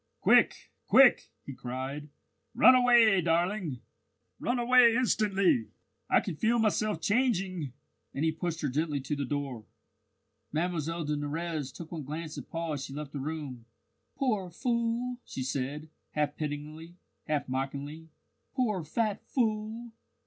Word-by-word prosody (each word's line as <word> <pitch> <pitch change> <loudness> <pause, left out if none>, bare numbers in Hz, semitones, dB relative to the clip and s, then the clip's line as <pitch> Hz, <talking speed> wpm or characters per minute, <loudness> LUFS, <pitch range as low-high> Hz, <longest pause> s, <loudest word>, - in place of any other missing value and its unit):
"Quick! - - +3 0.2
quick!" - - +6 0.2
he 140 - -6
cried. 130 +4 -5 0.5
"Run 255 +4 +8
away, 240 -6 +6
darling! 170 - 0 0.6
run 245 +1 0
away 240 -1 +6
instantly. 200 - +2 0.4
I - - +5
can - - -4
feel 230 +5 +2
myself 215 -1 +1
changing!" 195 - 0 0.4
and 145 - -1
he 160 - +3
pushed 165 +1 -4
her 150 - 0
gently 145 +2 -1
to 135 +3 -3
the 140 -1 -2
door. 135 -4 -3 0.9
Mlle 165 0 -1
de 150 0 -1
Nurrez 150 -1 -3
took 165 +2 -10
one 165 -3 -4
glance 155 +3 -6
at - - -8
Paul 165 -1 -3
as 140 -2 -4
she 135 - -9
left 150 -1 -6
the 145 - -5
room. 140 -5 -5 0.5
"Poor 215 -9 0
fool!" 235 +4 -1
she 130 - -5
said, 140 +3 -3 0.3
half 150 -1 0
pityingly, 155 +3 -6 0.3
half 150 -2 -1
mockingly. 140 +4 -4 0.5
"Poor 215 -9 0
fat 210 +6 -1
fool! 225 -1 -1
165 Hz, 140 wpm, -30 LUFS, 145-215 Hz, 0.9 s, Run